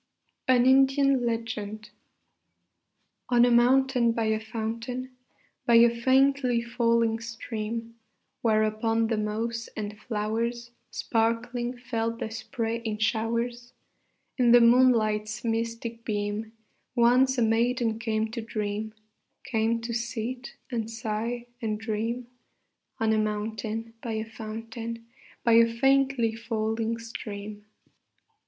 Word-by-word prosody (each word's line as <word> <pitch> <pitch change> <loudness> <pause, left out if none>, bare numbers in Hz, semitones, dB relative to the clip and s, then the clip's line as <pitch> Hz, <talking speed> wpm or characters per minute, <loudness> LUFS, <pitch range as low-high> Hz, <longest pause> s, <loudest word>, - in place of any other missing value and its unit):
AN 250 -1 +5
INDIAN 270 -1 +4
LEGEND 215 -2 -4 1.4
On 245 -1 +5
a 245 - +3
mountain 250 0 +4
by 230 - -1
a 220 0 +1
fountain, 230 +3 -5 0.5
By 235 - +5
a 230 0 +7
faintly 260 +1 +3
falling 230 -1 +1
stream, 230 0 -5 0.5
Where 215 -2 +3
upon 225 +1 +1
the 225 - 0
moss 225 +2 -2
and 210 -1 -4
flowers, 230 +2 -2 0.2
Sparkling, 240 +2 -1
fell 230 -2 -2
the 220 - -4
spray 230 0 -3
in 215 -2 -2
showers, 235 +2 -1 0.7
In 240 -1 +5
the 245 - +9
moonlight's 230 -3 +3
mystic 230 0 -3
beam, 210 0 -2 0.4
Once 255 +2 +4
a 240 - +3
maiden 230 0 +1
came 220 -1 -1
to 230 0 -4
dream, 215 -1 -4 0.5
Came 230 0 0
to 235 0 -4
sit 240 +1 -4 0.2
and 225 -2 -2
sigh 230 +1 -3 0.2
and 215 -2 -2
dream: 225 +2 -2 0.7
On 220 -1 +2
a 215 - +2
mountain 220 +1 -3
by 230 - -4
a 220 0 -2
fountain, 225 +1 -7 0.4
By 230 - +4
a 230 0 +4
faintly 270 -1 +2
falling 225 0 -2
stream. 210 -2 -7
230 Hz, 115 wpm, -27 LUFS, 220-240 Hz, 1.4 s, the